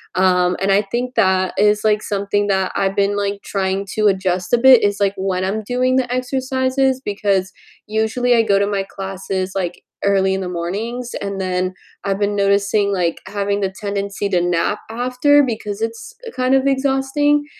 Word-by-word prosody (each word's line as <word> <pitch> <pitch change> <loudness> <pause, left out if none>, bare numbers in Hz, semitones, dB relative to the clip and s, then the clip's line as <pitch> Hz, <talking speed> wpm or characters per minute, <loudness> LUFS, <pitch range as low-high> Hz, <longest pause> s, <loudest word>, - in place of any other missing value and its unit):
um, 180 -1 +3
and 195 +1 +2
I 195 +1 +4
think 240 +5 -3
that 185 -1 +2
is, 210 0 +3
like, 210 -1 +2
something 205 0 -1
that 190 -2 +1
I've 195 0 0
been, 200 0 +1
like, 200 0 -2
trying 195 0 -2
to 215 -1 +3
adjust 185 -2 0
a - - +7
bit 255 0 +7
is, 205 0 +1
like, 200 -1 +2
when 190 -1 -2
I'm 215 +3 -2
doing 250 +3 0
the 255 -2 0
exercises, 260 +1 0
because 200 -2 0 0.3
usually 220 +3 +1
I 230 - +5
go 205 -3 +2
to 200 - +2
my 200 -1 -1
classes, 190 -1 -4
like, 180 -2 -3 0.2
early 190 -1 +2
in 190 - -2
the 180 - -4
mornings, 215 +8 -4
and 200 -1 -4
then 185 0 -1 0.3
I've 195 -1 -1
been 205 0 0
noticing, 200 0 +2
like, 175 -4 0
having 200 0 -2
the 190 -1 -1
tendency 200 0 -3
to 180 -2 +2
nap 175 +4 0
after 250 +5 +3
because 215 -4 -4
it's 230 - -5 0.2
kind 255 +1 +1
of 270 0 +2
exhausting, 275 +2 +1
200 Hz, 180 wpm, -19 LUFS, 190-245 Hz, 0.3 s, a